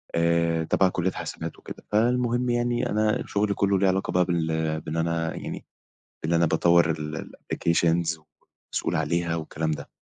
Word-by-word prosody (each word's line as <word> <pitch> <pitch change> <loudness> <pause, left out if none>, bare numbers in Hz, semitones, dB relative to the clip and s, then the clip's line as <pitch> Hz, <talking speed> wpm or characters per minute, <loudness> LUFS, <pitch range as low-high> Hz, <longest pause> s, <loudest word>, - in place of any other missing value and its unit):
آآ 85 -1 +2
تبع 95 +3 +3
كلّية 90 +1 -1
حسابات 80 -2 -6
وكده. - - -10
فالمهم 120 +2 +2
يعني، 120 +1 0
أنا 110 0 +1
شُغلي 100 0 +1
كلّه 100 -1 +2
ليه 95 - +3
علاقة 95 +1 0
بقى 90 0 +3
بال 80 -2 -1
بإن 80 +2 -4
أنا 80 0 -1
يعني، - - -6 0.6
بإن 80 - 0
أنا 85 0 +4
باطوّر 85 +1 +4
ال 75 0 -5 0.2
الapplications 85 -1 +1 0.4
ومسؤول - - -2
عليها 85 -1 0
والكلام 80 0 -2
ده. 75 - -5
85 Hz, 155 wpm, -26 LUFS, 80-100 Hz, 0.6 s, أنا